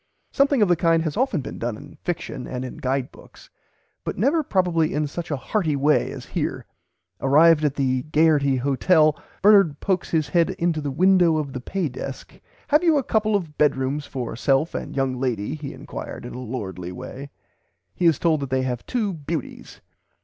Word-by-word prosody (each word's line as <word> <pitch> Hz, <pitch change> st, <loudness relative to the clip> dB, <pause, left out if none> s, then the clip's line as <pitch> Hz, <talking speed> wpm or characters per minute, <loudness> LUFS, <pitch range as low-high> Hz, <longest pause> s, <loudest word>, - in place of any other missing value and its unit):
Something 275 Hz, -4 st, +3 dB
of -, -, +3 dB
the 175 Hz, -, +4 dB
kind 165 Hz, 0 st, +2 dB
has 155 Hz, -3 st, -3 dB
often 260 Hz, -, 0 dB
been -, -, -8 dB
done 115 Hz, -2 st, -3 dB
in -, -, -13 dB
fiction 175 Hz, -7 st, -4 dB
and 130 Hz, 0 st, -4 dB
in 130 Hz, -, -8 dB
guide 135 Hz, -2 st, -2 dB
books, -, -, -17 dB, 0.5 s
but -, -, -4 dB
never 320 Hz, +3 st, +2 dB
probably 175 Hz, -, +1 dB
in 150 Hz, 0 st, +1 dB
such 170 Hz, +4 st, -6 dB
a 145 Hz, -, -1 dB
hearty 160 Hz, +1 st, -1 dB
way 145 Hz, +2 st, +2 dB
as -, -, -8 dB
here. -, -, -3 dB, 0.5 s
Arrived 155 Hz, +3 st, +5 dB
at 145 Hz, -2 st, +1 dB
the 130 Hz, -2 st, 0 dB
"Gaierty" 150 Hz, -4 st, +3 dB
Hotel 150 Hz, +4 st, +3 dB, 0.3 s
Bernard 195 Hz, -8 st, +5 dB
pokes 190 Hz, -2 st, -1 dB
his 155 Hz, -3 st, 0 dB
head 170 Hz, -2 st, +3 dB
into 170 Hz, -2 st, 0 dB
the 145 Hz, -, -3 dB
"window 175 Hz, +2 st, +4 dB
of 145 Hz, -3 st, -3 dB
the 130 Hz, -, -5 dB
pay 185 Hz, +5 st, -2 dB
desk. 135 Hz, +1 st, -7 dB, 0.4 s
Have 300 Hz, +3 st, +4 dB
you 325 Hz, -3 st, +4 dB
a 275 Hz, -, +1 dB
couple 215 Hz, -2 st, +1 dB
of 165 Hz, -7 st, -3 dB
bedrooms 145 Hz, 0 st, +1 dB
for 125 Hz, -5 st, -5 dB
self 135 Hz, +6 st, +1 dB
and -, -, -5 dB
young 135 Hz, -2 st, -1 dB
lady 120 Hz, -3 st, -2 dB
he 150 Hz, -3 st, -6 dB
enquired -, -, -8 dB
in 120 Hz, -, -7 dB
a -, -, -6 dB
lordly 95 Hz, -8 st, -5 dB
way." 135 Hz, +9 st, -8 dB, 0.6 s
He 175 Hz, -, +1 dB
is 160 Hz, -5 st, +4 dB
told 160 Hz, -3 st, +2 dB
that 140 Hz, -2 st, -4 dB
they 130 Hz, 0 st, 0 dB
have 125 Hz, -2 st, -3 dB
two 220 Hz, -6 st, -1 dB
beauties. 155 Hz, -2 st, -6 dB
150 Hz, 195 wpm, -23 LUFS, 130-175 Hz, 0.6 s, Arrived